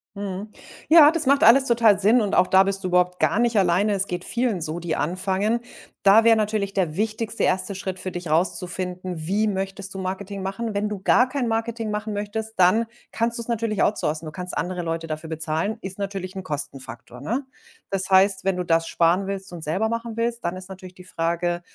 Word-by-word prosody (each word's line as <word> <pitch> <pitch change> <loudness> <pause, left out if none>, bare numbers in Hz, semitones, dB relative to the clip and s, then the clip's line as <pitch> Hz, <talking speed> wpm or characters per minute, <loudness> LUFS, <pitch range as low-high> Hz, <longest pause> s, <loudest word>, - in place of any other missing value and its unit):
Mhm. 200 +1 -5 0.4
Ja, 310 -2 +9
das 330 -2 -1
macht 280 +1 +3
alles 265 +5 +7
total 230 -4 +4
Sinn 215 +5 +4
und 205 -3 0
auch 180 - +4
da 190 0 +5
bist 195 0 -1
du 185 - -2
überhaupt 180 0 +1
gar 210 - +2
nicht 235 -2 +2
alleine. 195 +2 +2
Es 195 0 0
geht 180 0 -4
vielen 235 -5 -1
so, 160 +1 -3
die 170 -2 -3
anfangen. 190 +7 0 0.4
Da 205 +3 +6
wäre 230 0 +6
natürlich 210 -2 -1
der 175 -6 -1
wichtigste 220 +1 -2
1. 190 +2 +1
Schritt 190 -1 -5
für 185 - -4
dich, 175 -2 -6
rauszufinden: 180 0 -2
„Wie 210 +4 +1
möchtest 195 -1 -3
du 190 - -6
Marketing 195 +1 -5
machen?“ 195 +4 -4
Wenn 205 +1 -1
du 210 -2 -5
gar 245 +6 +3
kein 255 -2 -2
Marketing 225 -1 -2
machen 210 +1 -3
möchtest, 210 +2 -4
dann 215 +6 +4 0.2
kannst 235 +1 0
du - - -3
es - - -9
natürlich 230 -3 -1
outsourcen. 160 -6 0
Du 155 - -6
kannst 180 +2 -3
andere 180 +4 -2
Leute 165 0 -3
dafür 155 +1 -6
bezahlen. 160 +6 -2
Ist 190 -1 -6
natürlich 195 -2 -5
'n 190 - -5
Kostenfaktor, 130 -6 -5
ne? 240 - -2 0.5
Das 195 -1 0
heißt, 190 0 +4
wenn 195 -1 0
du 180 - -1
das 165 -1 +1
sparen 175 +3 +2
willst 195 -2 -5
und 170 -2 -6
selber 190 +9 -1
machen 230 0 -4
willst, 235 0 -1
dann 175 +2 -2
ist 185 0 -8
natürlich 185 -1 -11
die 180 - -13
Frage: 175 0 -2
195 Hz, 215 wpm, -23 LUFS, 180-220 Hz, 0.5 s, Ja